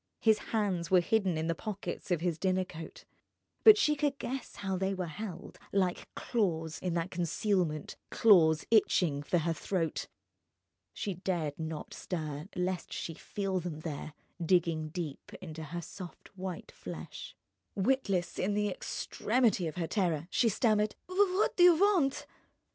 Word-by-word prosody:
His 220 -2 +4
hands 190 -6 0
were 185 - +6
hidden 190 -2 +1
in 160 - -1
the 165 - +1
pockets 205 +3 -5
of 175 -3 +1
his 170 -2 -1
dinner 185 0 +1
coat; 165 -3 -10 0.6
but 435 -1 +10
she 300 -7 +3
could 290 -1 0
guess 265 -1 -5
how 195 -1 -2
they 190 +1 0
were 185 -1 -2
held, 180 +2 -7
like 185 -3 0
claws, 165 -9 -1
in 180 -2 -2
that 170 +2 -1
concealment, 175 -2 0
claws 160 -8 +5
itching 175 -9 +3
for 160 +4 +1
her 165 0 +1
throat. 165 0 -2 0.8
She 200 - -3
dared 170 -5 -2
not 160 -1 -5
stir 155 -3 -4
lest 180 0 -2
she 165 - -4
feel 195 +3 -2
them 165 -3 -5
there, 155 -1 -5 0.3
digging 165 -3 +2
deep 155 -4 -6
into 160 -3 -7
her 170 +3 -5
soft 185 +2 -10
white 185 -2 -6
flesh. - - -8 0.4
Witless, 195 -5 0
in 200 +2 +1
the 210 0 +1
extremity 215 0 0
of 155 - -5
her 175 -2 -1
terror, 170 -4 0
she 235 - +3
stammered: 215 0 +2
"What 375 +1 +2
do - - +2
you 350 -1 +9
want?" 350 -7 +3
185 Hz, 155 wpm, -31 LUFS, 165-210 Hz, 0.8 s, but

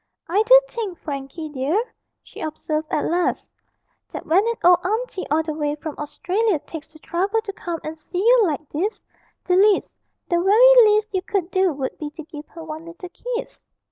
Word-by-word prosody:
'I 380 +6 +2
do - - +9
think, 425 -8 -5
Frankie 285 +2 -6
dear,' 315 - -1 0.3
she - - -12
observed 310 0 -3
at 295 - 0
last, 350 +1 -1 0.6
'that - - -7
when 365 +5 +4
an 465 - 0
old 355 0 +6
auntie 435 0 -2
all 310 +2 +2
the 315 -1 -4
way 295 -1 -2
from 305 0 -6
Australia 370 +7 0
takes 305 +1 -10
the 315 - -15
trouble 385 +7 -1
to 400 -3 -6
come 345 -3 -5
and 315 +1 -6
see 355 - -7
you 470 +5 +5
like 310 -4 -2
this, 385 +9 -2 0.5
the 360 - +1
least 405 +1 +3 0.3
the 345 -1 +1
very 465 +4 +7
least 425 +1 +2
you 375 - 0
could 375 -2 -2
do 375 -1 +2
would 270 -2 -5
be 300 - -4
to 315 +2 -10
give 300 -1 -10
her 330 - -11
one 320 +1 -7
little 345 +2 -10
kiss.' 485 +4 -6
350 Hz, 195 wpm, -22 LUFS, 310-420 Hz, 0.6 s, do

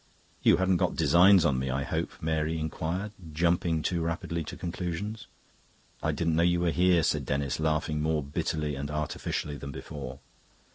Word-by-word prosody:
"You - - +5
hadn't 95 -1 +2
got - - 0
designs 90 0 +6
on 70 -5 +2
me, 65 0 -2
I 65 +2 -1
hope?" - - -2
Mary 80 0 -1
inquired, 80 +6 -3 0.2
jumping 85 0 +1
too 85 -2 0
rapidly 85 0 -2
to - - -7
conclusions. 90 +5 -4 0.7
"I - - +1
didn't 85 -1 0
know 85 - +3
you 85 0 +3
were 85 -1 +2
here," 90 -1 +4
said - - +1
Denis, 70 0 -1
laughing 75 -1 0
more 80 -1 +1
bitterly 75 +2 -2
and 70 +1 -4
artificially 75 -1 -3
than 70 +1 -7
before. 70 -2 -7
80 Hz, 170 wpm, -29 LUFS, 75-85 Hz, 0.7 s, designs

